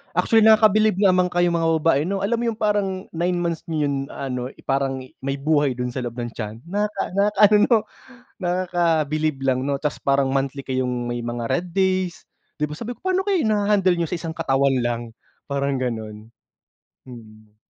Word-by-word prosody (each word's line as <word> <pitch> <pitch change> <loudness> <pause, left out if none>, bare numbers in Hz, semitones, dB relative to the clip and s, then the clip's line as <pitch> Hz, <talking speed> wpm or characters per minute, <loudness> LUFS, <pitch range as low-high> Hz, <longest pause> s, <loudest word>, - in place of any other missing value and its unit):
Actually 225 -2 +4
nakakabilib 215 -1 +5
naman 185 -2 +4
kayong 175 -1 +1
mga 165 0 +1
babae, 145 -4 +3
'no? 195 0 -2
Alam 230 +3 +1
mo - - -2
yung - - -16
parang, 200 -3 0
9 175 +2 -1
months 170 -2 -2
niyo 155 -3 0
yun 140 - -1 0.2
ano, 125 -2 -4
i - - -19
parang 135 -1 -1
i 130 - -14 0.2
may 135 - -1
buhay 145 -2 +2
dun 125 0 -3
sa 130 - -4
loob 120 0 -6
ng 120 -1 -4
tiyan. 110 0 -7
Nakaka 205 0 -1
nakaka-ano 210 +1 +5
'no, 235 - +5 0.6
Nakakabilib 165 -5 0
lang 130 -1 +1
'no. 140 -1 -1
Tapos 150 - -2
parang 140 -1 +1
monthly 135 +1 -1
kayong 125 -2 -2
may 120 - -2
mga, 120 0 -3
red 180 +1 0
days, 185 -3 0 0.4
'di 150 - 0
ba? 150 - -6
Sabi 235 +1 -5
ko, - - -31
"Paano 375 0 0
kaya 385 -4 +2
naha-handle 205 -4 +2
niyo 170 - 0
sa 170 - -3
isang 165 -1 -6
katawan 135 0 +2
lang?" 120 -1 -1 0.5
Parang 140 0 0
gano'n. 110 -3 -5 0.8
Mm. 110 -3 -14
155 Hz, 185 wpm, -22 LUFS, 130-190 Hz, 0.8 s, nakakabilib